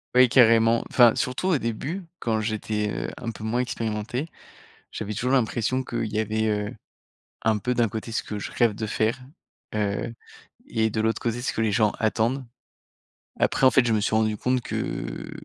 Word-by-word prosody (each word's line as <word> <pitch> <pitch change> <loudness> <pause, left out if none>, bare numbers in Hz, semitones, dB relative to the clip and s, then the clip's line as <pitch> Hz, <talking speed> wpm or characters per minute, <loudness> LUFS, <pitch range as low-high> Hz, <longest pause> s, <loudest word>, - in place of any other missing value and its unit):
Oui, 125 0 +7
carrément, 115 -2 +5
enfin, 120 -3 +6
surtout 125 +7 -1
au 180 -5 +3
début, 135 - -3 0.2
quand 110 -2 0
j'étais, 110 -1 -2
heu, - - -3
un 115 - -4
peu 110 - -10
moins 115 +3 0
expérimenté, 115 +3 -3 0.6
j'avais 105 -1 -4
toujours 125 +5 -1
l'impression 120 +1 +1
qu'il 115 -3 -3
y 105 - -2
avait, 110 0 0
heu, 105 -1 -1 0.7
un 110 -1 +2
peu, 125 +4 -1
d'un 120 -2 +2
côté, 110 +2 -5
ce 110 - -1
que 105 - -6
je 100 - -5
rêve 115 -3 +2
de 110 - -3
faire, 110 +3 0 0.5
heu 105 +1 -1 0.5
et 110 -1 0
de 110 - 0
l'autre 110 +1 0
côté, 120 0 -1
ce 125 - -1
que - - -1
les 110 -1 +2
gens 105 +1 +3
attendent. 115 +4 0 0.9
Après, - - +2
en - - +8
fait, 130 -2 +4
je 115 - +2
me 110 - +2
suis 105 - 0
rendu 110 -1 +2
compte 125 +3 0
que - - -4
115 Hz, 190 wpm, -25 LUFS, 110-120 Hz, 0.9 s, en